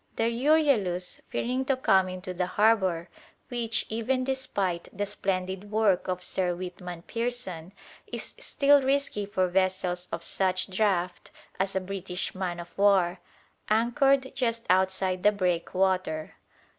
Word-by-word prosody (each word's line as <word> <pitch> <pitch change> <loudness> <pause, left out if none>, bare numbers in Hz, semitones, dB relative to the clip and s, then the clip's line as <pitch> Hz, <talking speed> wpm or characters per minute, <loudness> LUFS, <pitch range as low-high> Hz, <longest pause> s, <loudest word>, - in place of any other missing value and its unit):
The - - 0
"Euryalus," 235 - +2
fearing 255 +2 -1
to 270 -1 +1
come 190 -7 +3
into 185 0 -6
the 180 0 -1
harbour, 190 -4 +2 0.4
which, 235 -3 -1
even 240 +4 0
despite 205 -10 -2
the 205 +1 -2
splendid 195 -1 -2
work 210 -4 +2
of 180 -1 -2
Sir 180 -2 0
Weetman 180 -1 -7
Pearson, 230 -8 -4 0.4
is - - -5
still 285 0 +4
risky 270 -6 0
for 185 -2 +1
vessels 180 -1 0
of 165 - -4
such 185 0 0
draught 185 -4 0 0.3
as 195 0 0
a - - +3
British 190 -1 -4
man 180 -2 -3
of 175 0 -10
war, 195 -3 +4 0.5
anchored 265 +5 +3
just 230 -3 -1
outside 185 0 +1
the 210 - +5
breakwater. 185 -3 0
190 Hz, 130 wpm, -28 LUFS, 180-230 Hz, 0.5 s, the